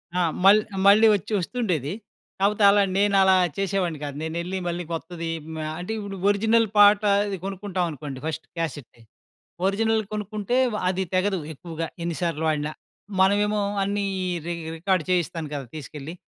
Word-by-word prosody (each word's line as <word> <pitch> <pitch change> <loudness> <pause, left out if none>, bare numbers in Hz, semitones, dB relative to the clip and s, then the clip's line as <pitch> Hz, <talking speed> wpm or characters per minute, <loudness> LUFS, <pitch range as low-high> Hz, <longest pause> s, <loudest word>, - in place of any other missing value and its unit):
ఆ! - - +1 0.3
మల్ 205 +2 +8 0.3
మళ్ళీ 215 +3 +7
వచ్చి 200 +3 -4
వస్తుండేది 180 - -2 0.5
కాపోతే 205 +1 +2
అలా 200 0 +5 0.2
నేను 200 0 +3
అలా 190 0 +5 0.2
చేసేవాడిని 190 -5 -1
కాదు. 140 -1 -5
నేను 160 0 -4
ఎళ్లి 185 +2 -4
మళ్ళీ 175 +1 -2
కొత్తది 165 0 -5 0.4
ఆహ్! 155 - -4
అంటే 180 +5 -5
ఇప్పుడు 200 -2 -6
ఒరిజినల్ 220 +2 +3
పాట 205 +1 +7 0.2
అది 200 -2 -3
కొనుక్కుంటామనుకోండి 180 -8 -4 0.4
క్యాసెట్ 155 -7 -5 1.1
కొనుక్కుంటే 210 +2 -2 0.2
వ - - -1
అది 190 +1 -1
తెగదు 190 +1 +1 0.2
ఎక్కువగా 165 +2 -6 0.2
ఎన్ని 170 -1 -2
సార్లు 165 -3 -1
వాడినా, 150 -1 0 0.5
మనమేమో 205 +2 +3 0.2
అన్నీ 200 +1 -1 0.4
రి 175 - -2 0.2
రికార్డ్ 185 0 +1
చేయిస్తాను 175 -2 -1
కదా 140 -3 -4
తీసుకెళ్ళి 150 +1 -7
185 Hz, 140 wpm, -24 LUFS, 165-205 Hz, 1.1 s, మల్